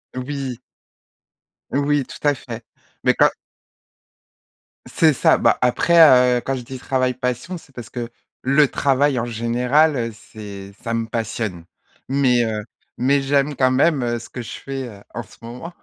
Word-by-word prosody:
Oui. 130 -1 -4 1.1
Oui 145 +1 +2
tout 150 - -4
à 145 - +5
fait, 120 -3 -8 0.4
mais - - +4
quand - - +5 1.6
C'est 160 -2 +3
ça, - - +4
bah - - +3
après 125 -1 +5
heu, - - -2
quand 135 - -1
je 130 - -5
dis: 130 +1 -8
«Travail 130 0 0
passion», 125 +8 -3
c'est 135 - -21
parce 120 -3 -9
que 120 -2 -5 0.3
le 140 +3 +4
travail 140 0 +1
en 115 - -1
général, 125 +6 +2
heu, 115 -2 -2
c'est 100 -2 -10
ça 115 -1 -2
me 115 0 -1
passionne. 110 -6 -4 0.4
Mais 130 -3 +3
heu, 110 -1 -3 0.3
mais 135 +3 +2
j'aime 140 +1 +1
quand 130 0 +3
même, 140 +2 +3
heu, 120 0 -1
ce 120 - -9
que 125 - -6
je 115 - -9
fais, 135 -2 -5
heu, 100 -3 -13
en 120 - -4
ce - - -19
moment. 120 +9 -8
125 Hz, 165 wpm, -21 LUFS, 115-140 Hz, 1.6 s, à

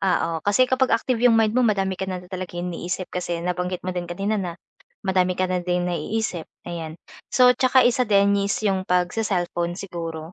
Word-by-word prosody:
oo, 185 -3 +1
kasi 205 +9 +3
kapag 260 -2 +2
active 235 0 -2
'yung 240 -2 +5
mind 220 -1 +3
mo, 255 - +2
madami 200 -5 +2
ka 190 - -2
na 185 - -2
talaga 185 -1 -6
inisip 180 +1 -4
kasi 175 -1 -3
nabanggit 180 0 -2
mo 185 - -2
din 175 -1 -4
kanina, 195 +4 -1
na 175 -2 -4 0.5
madami 185 -1 +1
ka 185 - +1
na 185 -1 -1
din 180 0 0
naiisip 180 -1 -2 0.2
ayan. 165 -2 -6 0.4
So, 250 0 +6
tsaka 260 0 +4
isa 250 +1 +3
din 200 -1 +4
is 200 0 0
'yung 190 -2 +1
pagse-cellphone 180 -2 0
siguro, 165 -3 -6
185 Hz, 185 wpm, -23 LUFS, 175-215 Hz, 0.5 s, So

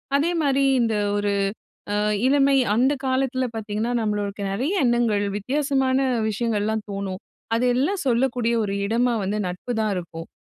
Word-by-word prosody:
அதேமாரி 285 -3 +2 0.2
இந்த 225 -2 +1 0.2
ஒரு 205 0 0 0.6
அ - - +1 0.3
இளமை 275 0 +4 0.2
அந்த 260 +5 +3
காலத்தில 260 0 0
பார்த்தீங்கன்னா, 220 +1 -2
நம்மளுக்குள்ள 205 -2 -2
நிறைய 260 - -1
எண்ணங்கள் 235 -4 +2
வித்தியாசமான 265 +3 0 0.3
விஷயங்கள்லாம் 220 -1 -1
தோணும். 195 -1 -4 0.3
அதெல்லாம் 250 +11 +1
சொல்லக்கூடிய 240 -1 +1
ஒரு 200 -1 -2
இடமா 240 +4 +1
வந்து 200 +2 -1
நட்பு 180 +7 -5
தான் 215 -1 0
இருக்கும். 165 -2 -6
235 Hz, 125 wpm, -23 LUFS, 205-265 Hz, 0.6 s, இளமை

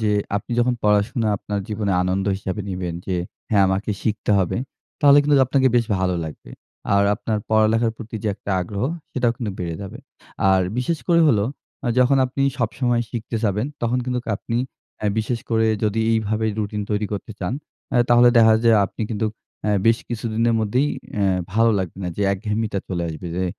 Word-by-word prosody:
যে 110 -1 +1 0.3
আপনি 105 - -6
যখন 120 +1 +3
পড়াশোনা 105 +2 +2
আপনার 100 +1 -4
জীবনে 105 -2 -1
আনন্দ 95 +2 -1
হিসাবে 95 +1 -4
নিবেন 90 -2 -3
যে, 95 - -1 0.3
হ্যাঁ, 100 -3 +4
আমাকে 95 +3 -1
শিখতে 110 -1 -1
হবে, 95 -3 0 0.4
তাহলে 145 -1 +7
কিন্তু 145 0 +3
আপনাকে 130 0 +3
বেশ 120 - +3
ভালো 90 -1 +1
লাগবে। 75 -6 -9 0.4
আর 100 - +4
আপনার 110 0 -2
পড়ালেখার 110 +1 +3
প্রতি 115 0 -9
যে - - +1
একটা 100 - -7
আগ্রহ, 100 +5 -3 0.3
সেটাও 125 -3 +1
কিন্তু 115 -4 -3
বেড়ে 85 -2 -3
যাবে। 95 - -8 0.5
আর 95 0 +4 0.2
বিশেষ 160 +6 0
করে 170 -1 +5
হলো 105 -6 +3 0.4
আ - - +2
যখন 130 +2 +4
আপনি 130 +2 -2 0.2
সবসময় 120 +1 0
শিখতে 115 0 -4
চাইবেন 105 +3 0 0.2
তখন 120 +2 +1
কিন্তু 125 -1 -2
আপনি 115 - -4 0.4
অ্যা 105 - -1
বিশেষ 115 +2 -1
করে 110 0 +3 0.2
যদি 105 +1 +1
এইভাবে 110 0 0
রুটিন 105 0 -2
তৈরি 105 0 0
করতে 105 +2 -5
চান, 90 +6 -2 0.4
অ্যা - - +2
তাহলে 120 0 +7
দেখা 110 -1 +7
যায় 115 -2 +6
আপনি 110 - -6
কিন্তু 110 0 -1 0.4
অ্যা 105 - +1 0.2
বেশ 115 0 +5
কিছুদিনের 115 0 0
মধ্যেই 125 +7 +1 0.3
অ্যা 100 - +1 0.3
ভালো 115 +1 +4
লাগবে 95 -2 -4
না 90 - -1
যে 105 - -1
একঘেয়েমিটা 105 +1 -2
চলে 85 -2 -2
আসবে 80 +2 -6
যে 95 - 0
110 Hz, 185 wpm, -22 LUFS, 100-120 Hz, 0.5 s, তাহলে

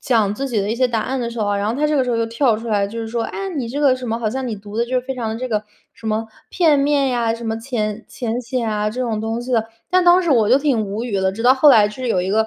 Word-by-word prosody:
讲 215 -5 +1
自 275 +4 -3
己 220 -5 0
的 200 - -2
一 - - 0
些 255 +1 +2
答 225 -2 -1
案 265 0 -2
的 235 -1 -3
时 235 - -7
候 210 - 0
啊， 205 0 0
然 200 +1 -1
后 275 - -4
他 300 - +3
这 300 - 0
个 265 - +3
时 250 - -2
候 230 - +1
又 230 0 0
跳 230 -1 +1
出 230 +2 -8
来， 205 -3 +1
就 220 +3 -6
是 225 - -4
说： 230 +1 -2
“哎 - - -5
呀， - - -3
你 240 -4 -2
这 285 +5 -3
个 275 -3 +4
什 255 -2 -6
么。” 225 +1 -1
好 220 -2 -1
像 260 +3 -3
你 215 - -3
读 205 +1 -10
的 235 - +2
就 240 - -12
是 - - +2
非 265 - -3
常 235 -3 -3
的 220 - -3
这 255 +2 -4
个， 215 -2 0 0.3
什 230 - -19
么 220 +1 -1 0.2
片 320 -5 +3
面 280 -1 +2
呀， 235 -2 +1
什 230 0 -8
么 225 0 -2
浅 225 -3 -3
浅 240 0 -3
显 235 -1 -2
啊 210 0 -1
这 250 - -5
种 225 -4 -1
东 225 +2 -2
西 250 +1 -5
的。 225 -2 +2 0.3
但 365 0 +3
当 355 +1 +6
时 335 - -1
我 225 -5 +4
就 255 - +7
挺 265 -7 +1
无 205 +4 -4
语 235 - -5
的， 190 0 +1
直 225 +3 -6
到 250 +1 +6
后 290 +3 +5
来 210 -4 +6
是 250 +4 -6
有 185 -5 +2
一 190 - -2
个 220 +1 +2
230 Hz, 375 characters per minute, -20 LUFS, 215-255 Hz, 0.3 s, 就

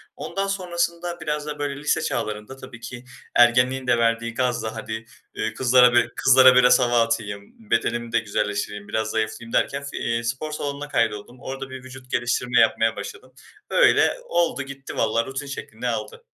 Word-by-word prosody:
Ondan 195 0 -3
sonrasında 175 -2 -2
biraz 150 -1 -2
da 150 -1 -6
böyle 145 -1 -2
lise 150 - +1
çağlarında 105 +4 -3
tabii 130 -3 -11
ki 120 +1 -8 0.3
ergenliğin 125 +2 +4
de 120 - +4
verdiği 115 0 0
gazla 120 -3 -1
hadi, 110 +1 -6 0.3
ııı, 110 - -2
kızlara 125 -1 +5
bir 120 - +4
kızlara 130 -1 +7
biraz 125 0 +6
hava 120 -1 +3
atayım, 110 -2 -4
bedenimi 115 0 0
de 115 - +3
güzelleştireyim 105 -1 -3
biraz 110 +1 -1
zayıflayayım 110 +1 -3
derken, 140 +1 +1
fi 140 - -7
eee, 115 0 -1
spor 130 +6 -3
salonuna 145 -1 -4
kaydoldum. 115 -2 -1
Orada 135 0 -6
bir 130 -1 -9
vücut 130 0 -12
geliştirme 125 0 +1
yapmaya 115 0 +3
başladım. 130 +5 -9 0.4
Öyle - - +4
oldu, 170 -4 +1
gitti 135 0 -9
valla, 115 +1 +1
rutin 135 +2 -5
şeklini 125 -3 -6
aldı. 110 -3 -4
125 Hz, 165 wpm, -23 LUFS, 115-135 Hz, 0.4 s, kızlara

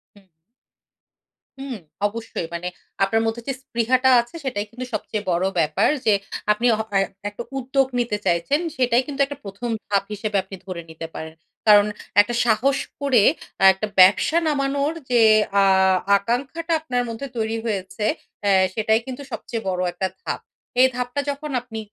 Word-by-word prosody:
হুম। 200 - -19 1.4
হুম, 270 -3 -5 0.3
অবশ্যই। 220 -5 -5
মানে 170 +1 -4 0.4
আপনার 225 +3 +2
মধ্যে 225 +1 -2
যে 270 - 0
স্পৃহাটা 255 +1 +2
আছে 235 +6 -14
সেটাই 245 -6 -2
কিন্তু 250 +2 -6
সবচেয়ে 215 0 -3
বড় 175 +2 +1
ব্যাপার। 155 -2 +2 0.2
যে 215 - +5 0.4
আপনি 210 +3 0
হ - - +2 0.2
এ - - +4 0.3
একটা 205 +3 -7
উদ্যোগ 265 +1 +1
নিতে 235 -3 0
চাইছেন, 175 - +2 0.2
সেটাই 250 -1 +2
কিন্তু 285 -1 -3
একটা 285 0 -8
১ম 200 +4 -6 0.2
ধাপ 200 -1 +1
হিসেবে 210 0 -2
আপনি 190 +1 -9
ধরে 185 -3 -5
নিতে 160 0 -7
পারেন। 160 0 -7 0.3
কারণ 205 -1 +8 0.4
একটা 240 +4 -3
সাহস 240 +5 +2 0.2
করে 260 -7 +4 0.3
অ্যা - - +3
একটা 190 +3 -4
ব্যবসা 195 - +6
নামানোর 280 0 0 0.2
যে 240 -1 +5 0.4
আ - - +5 0.5
আকাঙ্খাটা 270 +11 -2
আপনার 250 -6 -1
মধ্যে 230 +5 -5
তৈরি 225 0 -1
হয়েছে, 200 -1 -3 0.4
এ্যা 200 - +3 0.2
সেটাই 220 +1 +2
কিন্তু 260 +1 -6
সবচেয়ে 230 -2 -5
বড় 180 -1 -1
একটা 190 +2 -1
ধাপ। - - -3 0.4
এই 260 - +8
ধাপটা 250 +3 -2
যখন 285 +1 -6
আপনি 230 -2 -8
230 Hz, 160 wpm, -22 LUFS, 200-260 Hz, 1.4 s, কারণ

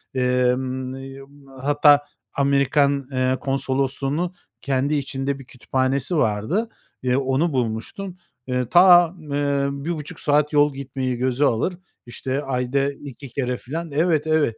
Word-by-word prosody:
Emm, 130 +1 0
emm, 135 +1 -11
hatta 145 0 +5 0.3
Amerikan, 140 0 +2
eee, 130 0 +1
Konsolosluğu'nun 135 +5 -1 0.3
kendi 140 +2 0
içinde 135 0 -2
bir 135 - -11
kütüphanesi 130 +5 -1
vardı. 140 - 0 0.3
Eee, 125 0 +2
onu 135 +4 +1
bulmuştum. 130 - -3 0.3
Eee, 125 -1 0
ta 175 -1 +7
m 150 -3 -6
eee, 140 -1 +1
1,5 150 +2 -5
saat 150 +1 +2
yol 145 -1 +4
gitmeyi 130 -2 -3
göze 130 +3 +1
alır, 155 +10 0 0.3
işte, 130 +4 -3
ayda 135 +1 0
2 140 -1 -10
kere 125 0 -2
filan 160 +4 -6
Evet, 160 0 +1
evet. 150 -8 +2
140 Hz, 130 wpm, -22 LUFS, 130-145 Hz, 0.3 s, ta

